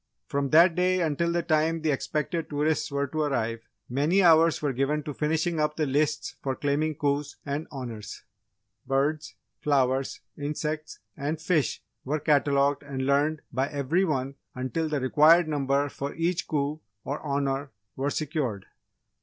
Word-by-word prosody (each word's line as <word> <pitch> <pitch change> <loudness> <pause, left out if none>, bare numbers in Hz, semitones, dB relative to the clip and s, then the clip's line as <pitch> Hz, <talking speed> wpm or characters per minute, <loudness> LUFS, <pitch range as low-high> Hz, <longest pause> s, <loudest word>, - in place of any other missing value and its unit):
From 140 -1 -1
that 170 +4 +6
day 185 +1 +2
until 170 +1 +1
the 170 0 0
time 160 +1 +1
the 155 - +2
expected 155 +4 -2
tourists 150 +1 0
were 140 0 0
to 155 +3 -3
arrive, 115 -6 -1 0.3
many 150 +10 +2
hours 165 -1 +6
were 145 -3 -1
given 140 +4 0
to 150 - -5
finishing 160 +3 0
up 150 0 +1
the 155 - 0
lists 150 +2 0
for 135 -1 -2
claiming 150 +2 0
coups 145 0 -1
and 145 +2 -3
Honours. 115 -7 -7 0.6
Birds, 140 +3 0 0.2
flowers, 135 -2 +1
insects 150 +1 -4 0.2
and 150 +2 -3
fish 160 -4 0 0.2
were 150 +4 -1
catalogued 145 -1 +2
and 135 -2 -4
learned 145 +3 +1
by 135 +1 +1
every 150 +5 +1
one 135 -6 -1 0.2
until 130 +5 -2
the 150 -2 0
required 155 +6 +5
number 140 -1 +1
for 140 0 -5
each 170 +1 -1
coup 150 0 -1 0.2
or 140 +2 -4
honour 140 -1 -1 0.3
were 135 +2 -1
secured. 140 - -2
145 Hz, 155 wpm, -27 LUFS, 140-155 Hz, 0.6 s, that